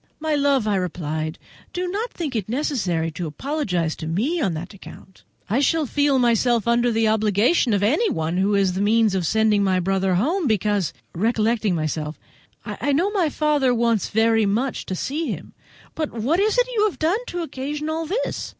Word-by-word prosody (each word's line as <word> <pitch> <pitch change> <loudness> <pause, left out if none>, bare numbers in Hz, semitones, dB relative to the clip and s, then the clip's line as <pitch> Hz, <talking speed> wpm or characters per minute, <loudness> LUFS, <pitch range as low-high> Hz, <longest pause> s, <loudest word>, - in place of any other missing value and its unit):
"My 310 0 -1
love," 280 -5 +2
I 205 -2 +2
replied, 160 -3 -3 0.4
"do 360 0 -2
not 420 +7 -3
think 300 -7 -4
it 215 -3 -2
necessary 205 - -1
to 170 +2 -5
apologize 180 - -2
to 160 - -6
me 250 - 0
on 185 - 0
that 175 +6 -7
account. 190 -1 -14 0.2
I 220 +6 +1
shall 315 +2 +2
feel 285 +1 +2
myself 240 -2 +2
under 240 +1 +3
an 225 -1 +1
obligation 220 - +2
to 205 -1 +2
anyone 215 - 0
who 200 +2 +2
is 195 -2 +2
the 190 - -2
means 220 0 +3
of 185 -4 0
sending 215 0 +2
my 190 -2 +2
brother 190 0 +1
home, 310 - +1
because," 205 - +1 0.2
recollecting 220 0 +1
myself, 155 -1 -3 0.5
"I 285 - -2
know 355 +8 +2
my 370 -7 +1
father 290 -4 +1
wants 230 -3 +1
very 225 -1 +3
much 240 +7 -1
to 190 - -3
see 300 - -3
him. - - -6 0.4
But 310 -2 -3
what 250 - 0
is 430 +4 +2
it - - +4
you 425 -2 +3
have 420 - -2
done 335 +7 +1
to 350 -1 -3
occasion 295 0 -4
all 320 +1 -2
this?" 435 +9 -2
225 Hz, 185 wpm, -22 LUFS, 190-300 Hz, 0.5 s, it